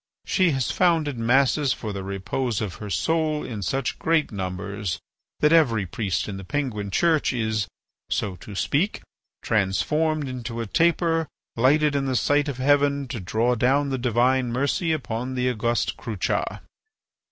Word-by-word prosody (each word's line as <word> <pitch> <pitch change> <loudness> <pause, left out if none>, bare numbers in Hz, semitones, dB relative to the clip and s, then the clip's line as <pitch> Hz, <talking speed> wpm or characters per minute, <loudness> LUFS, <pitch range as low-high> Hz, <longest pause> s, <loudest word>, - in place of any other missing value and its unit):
She 185 -3 +3
has 135 -5 0
founded 160 -8 +2
masses 135 +4 +3
for 110 -3 -5
the 100 -1 -5
repose 100 +5 -2
of 100 -5 -4
her 105 - -5
soul 155 +5 0
in 110 -4 -5
such 135 +7 -2
great 160 -2 +1
numbers 100 -1 -4 0.4
that 150 +1 +5
every 120 -11 +4
priest 95 +1 -2
in 100 -2 -5
the 95 - -7
Penguin 105 -3 -2
Church 160 - +2
is, 110 -4 -1 0.4
so 95 -3 -1
to 100 +4 -10
speak, 150 - 0 0.4
transformed 150 +10 +1
into 120 -2 -5
a 115 - -2
taper 165 - +2 0.3
lighted 145 +5 +3
in 140 -1 +1
the 130 - 0
sight 145 +4 +2
of 135 - -4
heaven 140 +1 +2
to 120 - -4
draw 110 +6 +1
down 135 +4 +2
the 135 -1 -2
divine 125 +1 +2
mercy 140 +7 0
upon 130 -4 -3
the 125 0 0
august 120 -1 0
Crucha." 110 -7 -2
125 Hz, 155 wpm, -24 LUFS, 110-145 Hz, 0.4 s, that